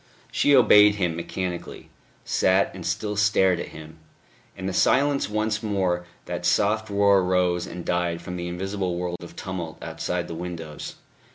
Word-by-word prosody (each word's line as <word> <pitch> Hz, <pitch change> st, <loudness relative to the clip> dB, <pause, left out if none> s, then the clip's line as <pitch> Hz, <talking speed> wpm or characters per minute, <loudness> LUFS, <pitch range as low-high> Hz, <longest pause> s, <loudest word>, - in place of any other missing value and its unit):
She 145 Hz, -, +4 dB
obeyed 105 Hz, -4 st, +7 dB
him 90 Hz, -5 st, -1 dB
mechanically 90 Hz, +1 st, -5 dB, 0.3 s
sat, -, -, +2 dB
and -, -, -8 dB
still 105 Hz, -1 st, -2 dB
stared 95 Hz, -4 st, +3 dB
at -, -, -4 dB
him. 80 Hz, +1 st, -12 dB, 0.6 s
In 95 Hz, -, -6 dB
the 95 Hz, -, -2 dB
silence 140 Hz, +6 st, +2 dB
once 110 Hz, +1 st, -1 dB
more 95 Hz, -5 st, -1 dB, 0.2 s
that -, -, -5 dB
soft 110 Hz, +1 st, +2 dB
roar 100 Hz, -1 st, +4 dB
rose 90 Hz, -1 st, +1 dB
and 85 Hz, -1 st, -7 dB
died 85 Hz, -1 st, 0 dB
from 90 Hz, +1 st, -7 dB
the 85 Hz, -1 st, -4 dB
invisible 95 Hz, +1 st, -3 dB
world 90 Hz, 0 st, -3 dB
of 85 Hz, 0 st, -11 dB
tumult 90 Hz, -4 st, -5 dB
outside -, -, -3 dB
the -, -, -6 dB
windows. 85 Hz, -2 st, -6 dB
90 Hz, 160 wpm, -25 LUFS, 85-105 Hz, 0.6 s, obeyed